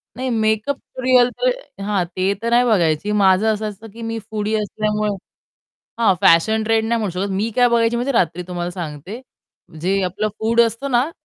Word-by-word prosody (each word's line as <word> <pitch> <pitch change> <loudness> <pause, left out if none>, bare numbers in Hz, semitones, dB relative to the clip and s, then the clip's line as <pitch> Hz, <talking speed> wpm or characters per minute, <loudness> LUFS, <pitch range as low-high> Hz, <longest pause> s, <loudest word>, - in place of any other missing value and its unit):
नाही 260 0 -3
makeup 220 +4 0 0.3
real 250 -1 +5
तर - - +3 0.3
हां, 200 -3 0
ते 190 +2 +1
तर 235 - -1
नाही 240 +1 +4
बघायची. 180 -3 +1
माझं 195 0 +3
असं 215 0 -3
असतं 210 +2 -11
की 230 - -11
मी 225 0 -4
फूडी 215 0 -2
असल्यामुळे 210 0 -1 0.9
हां, 205 -4 +5
फॅशन 220 +7 +4
ट्रेंड 225 0 +1
नाही 230 0 +1
म्हणू 205 -4 -2
शकत 200 0 -2
मी 210 +4 -1
काय 245 -1 +5
बघायची 230 0 +2
माहिती 250 +4 -1
रात्री 180 -3 +1
तुम्हाला 175 -1 -4
सांगते, 175 - -7 0.6
जे 195 +2 +1
आपलं 190 +4 -1
फूड 230 +2 +3
असतं 235 +4 -1
ना 245 +6 +2
215 Hz, 180 wpm, -20 LUFS, 195-230 Hz, 0.9 s, real